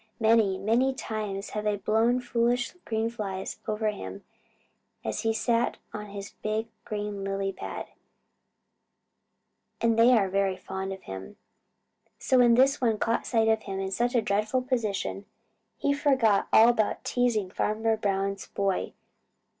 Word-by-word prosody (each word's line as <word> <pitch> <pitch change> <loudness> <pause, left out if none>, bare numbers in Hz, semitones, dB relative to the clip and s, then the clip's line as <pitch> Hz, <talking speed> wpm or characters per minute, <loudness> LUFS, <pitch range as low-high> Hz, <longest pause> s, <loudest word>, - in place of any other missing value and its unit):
Many, 220 -4 +4
many 235 +7 +2
times 210 -5 -4
they 210 - -1
have 210 -1 -2
blown 230 +3 +3
foolish 245 0 0
green 220 0 0
flies 195 -4 -5
over 215 0 0
to - - -9
him 95 +1 -8 0.8
as 110 -1 -2
he 225 - +1
sat 230 +2 +1 0.2
on 210 0 -6
his 200 0 -8
big 215 +1 -2 0.2
green 205 -1 -4
lily 195 0 -2
pad, - - -6 1.9
and 230 -1 +2
they 240 +2 +7
are 200 -3 +2
very 195 0 0
fond 190 +1 -5
of 190 - -7
him. 95 0 -8 0.8
So 260 - +2
when 240 -1 +6
this 270 +3 +4
one 225 -3 +2
caught 230 +2 0
sight 225 -2 +2
of 220 0 +3
him 195 -2 -5
in 190 0 -3
such 240 +5 0
a 235 - +3
dreadful 215 +5 0
position, 215 -5 -2 0.5
he 280 - +1
forgot 260 -8 +3
all 225 +2 +7
about 220 -3 0
teasing 230 -6 0
Farmer 220 +2 0
Brown's 195 -2 -2
boy. 195 -1 -1
215 Hz, 150 wpm, -27 LUFS, 195-235 Hz, 1.9 s, they